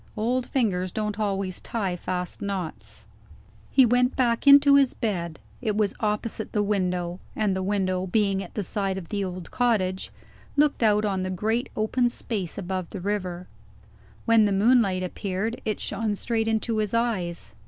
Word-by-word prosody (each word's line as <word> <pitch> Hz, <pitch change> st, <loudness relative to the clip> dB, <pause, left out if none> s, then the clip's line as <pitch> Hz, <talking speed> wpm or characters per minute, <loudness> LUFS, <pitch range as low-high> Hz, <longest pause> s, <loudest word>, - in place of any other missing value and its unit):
"Old 245 Hz, +3 st, 0 dB
fingers 185 Hz, -8 st, 0 dB
don't 210 Hz, +1 st, -3 dB
always 195 Hz, -3 st, -2 dB
tie 195 Hz, -6 st, -2 dB
fast 180 Hz, 0 st, -4 dB
knots." 195 Hz, -5 st, -5 dB, 0.6 s
He 265 Hz, -, +6 dB
went 250 Hz, +2 st, +2 dB
back 240 Hz, +1 st, +1 dB
into 280 Hz, 0 st, +8 dB
his 275 Hz, -2 st, +5 dB
bed. 170 Hz, -8 st, -2 dB, 0.2 s
It 215 Hz, -4 st, -1 dB
was 210 Hz, -2 st, +1 dB
opposite 215 Hz, +1 st, -2 dB
the 210 Hz, -, +2 dB
window; 180 Hz, -3 st, -1 dB, 0.2 s
and 210 Hz, -3 st, +1 dB
the 190 Hz, -, -1 dB
window, 185 Hz, -1 st, 0 dB
being 195 Hz, 0 st, +1 dB
at 180 Hz, -, -12 dB
the 210 Hz, -, -1 dB
side 195 Hz, 0 st, -1 dB
of 175 Hz, -4 st, -7 dB
the 205 Hz, -1 st, -1 dB
old 185 Hz, -2 st, -6 dB
cottage, 200 Hz, -7 st, 0 dB, 0.5 s
looked 295 Hz, -2 st, +3 dB
out 210 Hz, -1 st, +3 dB
on 195 Hz, -2 st, 0 dB
the 185 Hz, -, -2 dB
great 220 Hz, +7 st, -1 dB
open 240 Hz, +3 st, +1 dB
space 205 Hz, -7 st, -3 dB
above 185 Hz, -2 st, -3 dB
the 200 Hz, -, -6 dB
river. 185 Hz, -2 st, -3 dB, 0.8 s
When 230 Hz, -2 st, +5 dB
the 205 Hz, -, +1 dB
moonlight 200 Hz, -2 st, +3 dB
appeared, 195 Hz, +5 st, -3 dB
it 215 Hz, -, -1 dB
shone 220 Hz, -2 st, -1 dB
straight 225 Hz, +1 st, -1 dB
into 225 Hz, 0 st, 0 dB
his 215 Hz, +1 st, -1 dB
eyes. 190 Hz, -8 st, -1 dB
205 Hz, 165 wpm, -25 LUFS, 185-230 Hz, 0.8 s, into